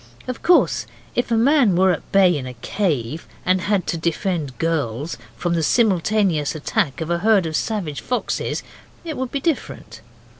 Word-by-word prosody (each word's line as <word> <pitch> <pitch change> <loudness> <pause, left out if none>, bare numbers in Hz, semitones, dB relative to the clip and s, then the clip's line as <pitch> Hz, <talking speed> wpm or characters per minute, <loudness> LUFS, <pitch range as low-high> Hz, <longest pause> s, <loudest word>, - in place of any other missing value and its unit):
Of 255 -2 -4
course, 165 - +3 0.3
if 245 - -1
a 230 - +2
man 245 - +4
were 185 +1 +4
at 165 - -4
bay 190 -3 +5
in 130 -3 -4
a 125 - -8
cave, 150 - -2 0.2
and 185 0 +2
had 200 -1 0
to 165 - -2
defend 165 -4 -2
girls 150 -3 -1 0.2
from 175 +8 -1
the 165 - +1
simultaneous 190 - +2
attack 155 0 -1
of 160 +1 -3
a 170 - +1
herd 210 -2 +3
of 160 -1 -3
savage 180 -10 -2
foxes 250 - -2 0.4
it 320 -2 -4
would 260 -1 -3
be 280 - -1
different. 220 - -3
175 Hz, 175 wpm, -21 LUFS, 155-220 Hz, 0.4 s, bay